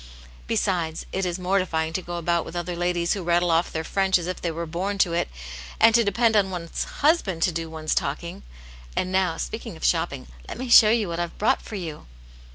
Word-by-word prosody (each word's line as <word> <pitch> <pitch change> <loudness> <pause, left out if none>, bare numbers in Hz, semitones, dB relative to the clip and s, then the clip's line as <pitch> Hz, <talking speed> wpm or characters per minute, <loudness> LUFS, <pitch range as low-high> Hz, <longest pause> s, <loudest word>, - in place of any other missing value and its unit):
Besides, 180 -7 -1
it 190 -1 -1
is 175 0 -2
mor 185 +2 +1
tifying 160 -3 -1
to 185 - -1
go 175 0 -6
about 170 0 0
with - - -9
other 175 0 -3
ladies 175 0 0
who 200 - -4
rattle 175 0 +2
off 165 +1 +2
their 160 - -3
French 190 +3 +2
as 175 - -5
if 185 0 -4
they 170 - -1
were 165 +1 -4
born 185 +5 -3
to 180 -4 +2
it, 170 - 0 0.5
and 225 - +6
to 235 0 +5
depend 225 +2 +2
on 200 -2 +3
one's 175 -3 -4 0.2
husband 215 - +2
to 180 - +3
do 165 0 -4
one's 155 -1 -2
talking. 150 - -3 0.5
And 185 - -1
now, 185 -3 +1
speaking - - -5
of - - -4
shopping, - - 0 0.2
let - - -6
me 255 +1 -5
show 225 -2 +9
you 220 -2 +2
what 170 0 -4
I've 175 -1 -4
brought 215 - +2
for 215 - -8
you." 165 - -6
175 Hz, 225 wpm, -24 LUFS, 165-195 Hz, 0.5 s, show